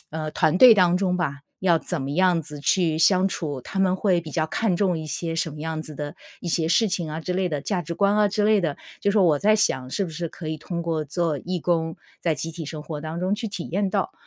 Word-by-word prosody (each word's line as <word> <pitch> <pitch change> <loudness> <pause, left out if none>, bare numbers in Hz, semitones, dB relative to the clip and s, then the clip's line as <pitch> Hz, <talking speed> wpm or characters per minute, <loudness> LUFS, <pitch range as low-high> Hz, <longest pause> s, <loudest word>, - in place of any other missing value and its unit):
呃， 155 0 -4
团 175 +4 +2
队 250 -3 +10
当 180 -3 +4
中 185 -2 +1
吧， 150 -6 -2 0.2
要 175 -3 +3
怎 135 - -3
么 135 - -4
样 175 +1 +2
子 150 -1 -9
去 160 0 +2
相 185 +3 +4
处， 145 -9 -4
他 195 - -6
们 185 -1 +3
会 185 -3 +2
比 160 -2 -9
较 155 +1 0
看 190 +1 0
重 180 -4 +1
一 155 - -6
些 165 +1 -3
什 165 0 -1
么 150 - -9
样 160 0 -3
子 155 -1 -9
的， 145 0 -5 0.3
一 175 - -5
些 160 0 +1
事 220 +6 +4
情 175 -5 -2
啊 155 - -4
之 180 +3 -3
类 185 0 0
的， 145 -3 -3
价 190 0 -1
值 170 0 -5
观 200 +3 +2
啊 210 -1 +4
之 210 +1 0
类 215 -1 +4
的。 160 -5 -1 0.2
就 200 - +2
说 200 -2 +4
我 155 -4 +4
在 215 +6 +4
想 130 -11 +1
是 195 +9 -1
不 170 - -6
是 165 +1 -4
可 160 -2 -8
以 155 0 -3
通 170 +2 -4
过 165 -2 -1
做 160 0 -1
义 180 +5 -3
工， 165 -1 0 0.2
在 165 -3 +1
集 160 +4 -4
体 160 -1 -6
生 150 0 -6
活 150 -1 -6
当 160 +2 -5
中 185 +3 +1
去 220 +1 -4
体 190 -4 -6
验 200 +2 +1
到？ 190 -1 -1
170 Hz, 290 characters per minute, -24 LUFS, 155-190 Hz, 0.3 s, 队